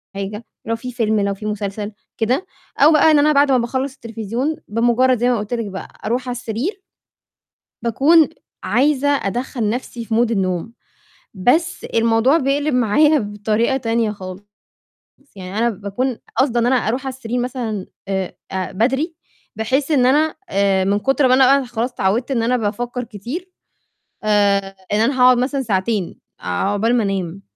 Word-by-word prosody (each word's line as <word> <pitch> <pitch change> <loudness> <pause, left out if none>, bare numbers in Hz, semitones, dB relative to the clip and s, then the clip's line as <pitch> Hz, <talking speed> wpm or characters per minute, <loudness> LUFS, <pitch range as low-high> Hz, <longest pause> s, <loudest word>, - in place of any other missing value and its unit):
حاجة، 210 +3 -5 0.2
لو 230 - -1
في 250 +2 -7
فيلم 220 -3 0
لو 200 0 0
في 210 +2 -9
مسلسل 210 0 -3 0.3
كده، 250 - 0 0.3
أو 300 +3 +7
بقى 310 +1 +5
إن 295 - +5
أنا 305 +1 +4
بعد 280 0 +4
ما 255 - +5
باخلّص 260 +3 -2
التلفزيون، 230 +5 -3
بمجرّد 240 +3 +2
زي 245 +1 +2
ما 245 - +2
قلت 210 +3 -5
لِك 230 -2 -1
بقى 195 -1 -7 0.2
أرُوح 250 +3 -1
على 245 - -2
السرير 250 - -4 1.0
باكون 295 +7 +4 0.3
عايزة 285 +1 +2
أدَخّل 240 -3 -1
نفسي 235 0 -4
في 220 - -2
mood 235 0 +2
النوم، 190 +1 -1 0.6
بس 315 - +1
الموضوع 230 +6 +3
بيقلب 285 0 0
معايا 290 +6 +4
بطريقة 215 +4 0
تانية 230 -3 0
خالص، 185 -1 -8 0.9
يعني 190 +2 -7
أنا 235 +1 +2
باكون 220 +5 -3 0.2
قاصدة 245 -3 +2
إن 235 - +2
أنا 260 - +3
أرُوح 250 +1 0
على - - -1
السرير 245 -1 -3
مثلًا 240 -6 -3 0.2
آآ، 190 -2 -3
أ 190 -1 -3
بدري 270 - 0 0.4
بحيث 265 +7 0
إن 255 -4 +4
أنا 300 +4 +3
آآ 195 -1 +2
من 200 +1 +1
كُتر 270 +3 +2
ما 255 - +4
أنا 270 +1 +5
خلاص 240 +1 -3
اتعوّدت 225 +8 0
إن 230 -3 +1
أنا 250 +2 +2
بافكّر 240 +3 -3
كتير، 245 - -7 0.7
آآ، 200 -2 +2 0.2
إن 210 - +2
أنا 255 +3 +1
هاقعد 250 -1 +7
مثلًا 270 +2 0
ساعتين، 200 -3 -1 0.2
عقبال 200 - 0
ما 230 - +2
أنام، 195 -1 -3
235 Hz, 165 wpm, -19 LUFS, 210-265 Hz, 1.0 s, أو